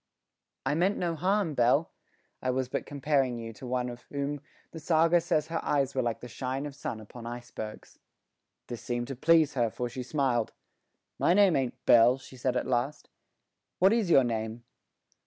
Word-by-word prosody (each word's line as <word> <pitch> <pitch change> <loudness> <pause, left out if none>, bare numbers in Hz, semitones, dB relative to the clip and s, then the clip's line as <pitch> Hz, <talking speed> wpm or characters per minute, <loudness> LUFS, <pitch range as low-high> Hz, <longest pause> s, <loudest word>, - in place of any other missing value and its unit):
"I - - +1
meant 180 +6 +2
no 170 -2 -1
harm, 185 0 +1
Belle. 125 +5 +2 0.5
I 130 - -1
was 130 0 0
but - - -3
comparing 140 -3 0
you 115 -1 -7
to 125 - -10
one 125 0 -1
of 120 0 -7
whom 140 0 -3 0.3
the 165 - -8
saga 165 +2 +3
says 165 -3 +1
her 165 - -2
eyes 140 -2 +1
were 130 - +1
like 115 -2 -2
the 125 - -7
shine 130 +3 -4
of 145 - -6
sun 135 -5 -5
upon 115 +2 -10
icebergs." 120 -3 -8 0.7
This 120 -2 -7
seemed 120 +1 -3
to 135 - -4
please 160 +2 +4
her, 120 -3 +1
for 120 +2 -4
she 130 - -6
smiled. 125 -4 0 0.7
"My 175 - +4
name 200 -4 +5
ain't 130 -3 -2
Belle," 120 +2 +6
she 130 0 -14
said 125 0 -1
at - - -1
last. 130 +3 -2 0.7
"What 190 +4 +5
is 225 -6 +1
your 135 -5 +6
name?" 115 0 -3
130 Hz, 185 wpm, -29 LUFS, 120-155 Hz, 0.7 s, Belle